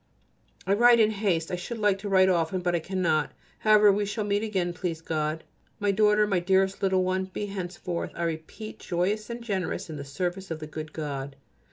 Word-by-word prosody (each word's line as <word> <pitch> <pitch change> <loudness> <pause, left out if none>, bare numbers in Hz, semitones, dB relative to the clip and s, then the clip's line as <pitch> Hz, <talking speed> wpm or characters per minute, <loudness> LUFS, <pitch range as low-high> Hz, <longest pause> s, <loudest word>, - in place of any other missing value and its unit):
I 195 - +2
write 240 +3 +6
in 215 -1 +5
haste. 195 -6 0
I - - 0
should 180 +7 -5
like 205 -3 +2
to 205 +1 -5
write 190 -1 +5
often, 180 0 +1
but 175 0 0
I 170 - +2
cannot. 165 -3 0 0.3
However, 210 -1 +6
we 205 +1 0
shall 210 +2 -2
meet 205 0 0
again, 190 -5 -1
please 175 -2 -3
God. 155 -1 -2 0.4
My 205 -1 +2
daughter, 210 +1 +4
my 195 -3 +1
dearest 190 +2 +2
little 190 -1 +2
one, 185 +1 0
be 190 +2 -5
henceforth, 180 -3 -4
I 170 - -3
repeat, 165 +7 -5
joyous 200 +5 -1
and 235 0 -6
generous 190 -4 -3
in 155 - -6
the 140 - -5
service 180 +7 -4
of 165 - -3
the 155 - -6
good 155 0 -7
God. 140 -3 -5
185 Hz, 205 wpm, -27 LUFS, 170-205 Hz, 0.4 s, write